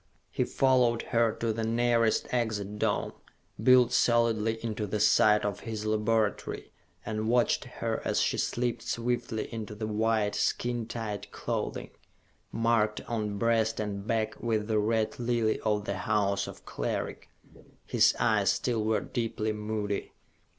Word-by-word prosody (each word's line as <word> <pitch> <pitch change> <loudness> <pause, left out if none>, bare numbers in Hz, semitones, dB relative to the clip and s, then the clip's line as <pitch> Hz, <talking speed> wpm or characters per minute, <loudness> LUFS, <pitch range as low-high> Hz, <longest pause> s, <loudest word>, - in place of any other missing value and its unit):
He - - 0
followed 125 -3 +2
her 115 -1 +2
to 115 -1 -1
the 115 +1 -3
nearest 115 0 +2
Exit 105 -4 -1
Dome, - - 0 0.5
built 125 -2 +6
solidly 115 -2 +2
into 110 -2 -2
the 105 +2 -2
side 105 0 +4
of 100 -2 -2
his 110 -2 -5
laboratory, 110 0 0 0.3
and 110 0 -2
watched 120 0 +2
her - - -3
as - - 0
she - - +1
slipped 120 -1 -1
swiftly 120 -1 -2
into 110 -2 -5
the 110 +1 -4
white, 110 -1 +1
skin 120 -2 -1
tight 110 -3 -5
clothing - - -4 0.6
marked 115 -2 +1
on 105 -3 -3
breast 115 0 +1
and 100 -1 -4
back 110 -1 -1
with 110 -3 0
the 110 -1 +2
Red 110 +2 0
Lily 120 -2 +1
of 105 -1 0
the 100 -2 -2
House 100 -2 0
of - - -11
Cleric. - - -4 0.6
His - - +4
eyes - - +3
still 115 -4 -1
were 110 0 +1
deeply 110 -2 -2
moody. 105 -1 -3
110 Hz, 145 wpm, -29 LUFS, 105-115 Hz, 0.6 s, built